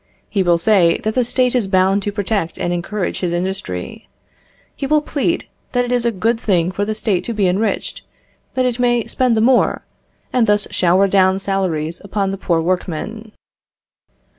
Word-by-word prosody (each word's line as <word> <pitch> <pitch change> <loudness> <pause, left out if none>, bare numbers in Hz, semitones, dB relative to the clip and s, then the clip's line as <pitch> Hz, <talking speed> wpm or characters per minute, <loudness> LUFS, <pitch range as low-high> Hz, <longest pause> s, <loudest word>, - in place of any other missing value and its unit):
He 200 - 0
will 175 -2 +3
say 175 -1 +3
that 220 - -1
the 250 - +2
State 250 +1 +1
is 240 -6 +1
bound 190 +1 +2
to 205 - -2
protect 200 -4 -2
and 175 - -1
encourage 180 +3 -3
his 180 -2 -1
industry; 175 - -4 0.7
he 275 - -3
will 305 +2 +4
plead 315 +4 -1 0.3
that 245 -1 +2
it 245 - -5
is 245 -1 +1
a 235 - +2
good 225 +3 0
thing 180 -5 +1
for 200 +2 -2
the 215 +1 -2
State 210 -4 0
to 235 - -3
be 200 -3 +2
enriched, 195 +5 -1 0.5
that 255 0 +1
it 245 -1 -1
may 240 -2 +2
spend 250 -3 +1
the - - +2
more, 250 +2 +2 0.5
and 240 -3 +3
thus 205 0 +3
shower 185 +2 +3
down 190 -1 +3
salaries 180 -5 -2
upon 200 -1 -1
the 195 - -4
poor 170 -4 +1
workmen. 185 +5 -3
200 Hz, 185 wpm, -18 LUFS, 185-230 Hz, 0.7 s, will